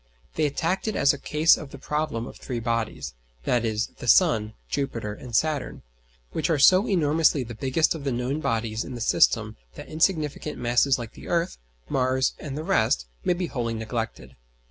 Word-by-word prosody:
They 155 -1 +1
attacked 165 +8 -1
it 215 - -1
as 140 - +4
a 145 - -6
case 155 +4 +4
of 155 - -8
the 140 - -10
problem 150 -5 -2
of - - -10
three 120 -2 -4
bodies, 115 - -2 0.3
viz. 115 -2 +1
the 125 - -11
sun, 110 - +4
Jupiter, 115 - -3
and 120 +2 -8
Saturn; 155 -1 0 0.5
which - - -1
are 160 - +3
so 185 - +6
enormously 155 -5 +3
the 120 0 -8
biggest 135 +7 +1
of 160 -4 -7
the 140 - -1
known 125 +4 -1
bodies 115 -5 -1
in 130 - -7
the - - -6
system 115 - +2 0.2
that - - -9
insignificant 155 -2 0
masses 125 +3 +2
like 120 -3 -7
the - - -12
Earth, 170 - -1 0.3
Mars, 130 - +1
and 145 -2 -6
the 155 - -4
rest, 110 - +2 0.2
may - - +2
be 175 +1 -2
wholly 120 -7 -3
neglected. 110 - -5
135 Hz, 185 wpm, -25 LUFS, 115-155 Hz, 0.5 s, so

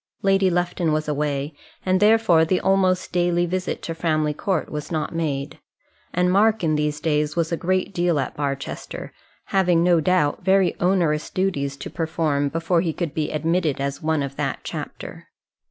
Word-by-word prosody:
Lady 195 -1 +3
Lufton 175 -1 0
was 155 0 -1
away, 145 0 -1 0.3
and 185 0 +2
therefore 210 -6 +5
the 180 +3 +1
almost 185 -1 +1
daily 175 0 +2
visit 185 +1 -3
to 165 - -3
Framley 155 -2 0
Court 185 +2 -1
was 150 +1 -5
not 155 0 -2
made; 145 -4 -3 0.5
and 180 +1 +1
Mark 215 +2 +3
in 155 -2 +2
these 150 0 -1
days 150 -2 0
was 170 0 0
a - - +2
great 185 +3 -1
deal 175 -4 +1
at 135 - -3
Barchester, 140 -1 -5 0.4
having, 180 -3 +3
no 175 -1 +4
doubt, 180 -3 +1
very 190 0 +3
onerous 175 -4 +1
duties 140 -8 -1
to - - -7
perform 155 -3 0
before 165 +2 +1
he 165 -3 -1
could 165 -3 -3
be 155 -2 -1
admitted 160 -1 0
as 140 0 -3
one 155 -2 0
of 140 0 -6
that - - -2
chapter. - - -7
165 Hz, 170 wpm, -23 LUFS, 150-185 Hz, 0.5 s, therefore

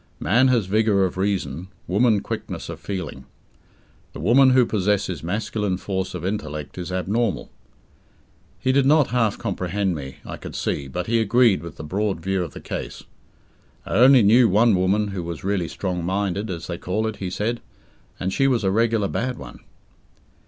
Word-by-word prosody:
Man 120 - +3
has 120 -5 +2
vigour 105 0 +2
of 90 - -3
reason, 95 -4 -2 0.2
woman 105 +2 +2
quickness - - -5
of - - -6
feeling. 90 -7 -6 0.9
The - - -8
woman 130 +3 +5
who 130 -1 +5
possesses 100 -5 0
masculine 100 +1 -2
force 95 -1 -3
of 90 -1 -5
intellect 75 -6 -4
is 90 +1 -5
abnormal." 95 0 -1 1.1
He 130 - +1
did 135 0 +3
not 150 -1 +4
half 115 -4 +1
comprehend 95 +1 -2
me, 70 -4 -7
I - - -6
could - - -9
see, 70 - -2
but 90 +6 -4
he 115 +2 +1
agreed 115 -4 +3
with 85 -1 -9
the - - -8
broad 95 +3 -1
view 95 +2 -1
of - - -7
the - - -8
case. - - -6 0.8
"I - - -5
only 125 +3 +7
knew 115 +3 +6
one 110 +4 +4
woman 100 +3 +1
who 95 -2 -4
was 85 -2 -6
really 95 -3 0
'strong 90 -2 -3
minded', 100 +3 -1
as 85 -2 -5
they 85 -1 -5
call 105 +5 -1
it," 110 -1 -3
he 95 - -4
said, 110 +6 -2 0.6
"and 95 +1 -2
she 135 - +2
was 120 -5 +1
a 95 - +2
regular 115 -1 +2
bad 125 +4 -2
one." - - -10
100 Hz, 180 wpm, -23 LUFS, 90-115 Hz, 1.1 s, only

